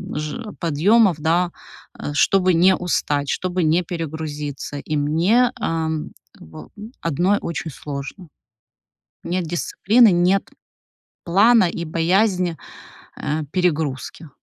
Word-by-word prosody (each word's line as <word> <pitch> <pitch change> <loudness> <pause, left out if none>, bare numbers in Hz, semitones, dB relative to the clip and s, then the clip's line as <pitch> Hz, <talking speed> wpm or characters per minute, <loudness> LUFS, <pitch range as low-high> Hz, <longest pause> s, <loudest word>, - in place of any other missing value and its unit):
ж 205 +9 -5
подъёмов, 185 +5 +3
да, 170 +3 +1 0.4
а 145 - -6
чтобы 185 +4 +3
не 180 +3 +5
устать, 145 -5 -1
чтобы 180 +1 -1
не 160 +3 +3
перегрузиться, 150 -4 -5
и 150 +2 -3
мне, 175 +12 +2
ам, 160 -1 -2 0.2
как - - -16
бы 80 - -11 0.3
одной 175 +6 +1
очень 165 -1 -4
сложно. 145 +6 -7 1.0
Нет 180 0 -2
дисциплины, 205 +7 +3
нет 180 +3 +2 0.8
плана 200 +5 +5
и 170 - -5
боязнь, 180 +2 +1 0.6
э, 155 +2 -2
перегрузки. 160 -4 -2
170 Hz, 110 wpm, -21 LUFS, 155-185 Hz, 1.0 s, не